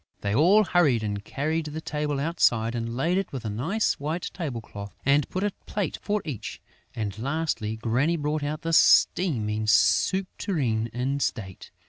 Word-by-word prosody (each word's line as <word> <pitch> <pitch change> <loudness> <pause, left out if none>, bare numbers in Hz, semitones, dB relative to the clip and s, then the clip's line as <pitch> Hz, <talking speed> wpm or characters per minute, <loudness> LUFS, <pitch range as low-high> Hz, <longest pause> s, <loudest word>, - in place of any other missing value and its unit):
They 100 0 -1
all 180 - +5
hurried 150 - +2
and 105 -1 -3
carried 155 +7 -2
the 150 +1 -5
table 150 -2 -2
outside 120 -7 +2
and 115 0 -3
laid 170 +7 +1
it 195 - -4
with 130 -4 -6
a 105 - -2
nice 165 - 0
white 155 +5 -3
table 150 -10 -4
cloth 100 -2 -9
and 140 +2 +3
put 185 - -2
a 205 - +1 0.2
plate 205 -3 -2
for 210 -1 -1
each; 140 -9 -6 0.4
and, 105 -2 -4
lastly, 140 -5 -2
Granny 125 +9 +1
brought 150 0 -1
out 150 +2 -3
the 165 0 -2
steaming 110 - +3
soup 190 - +3
tureen 120 - 0
in 130 +4 -1
state. 100 -9 -4
140 Hz, 170 wpm, -26 LUFS, 115-165 Hz, 0.4 s, all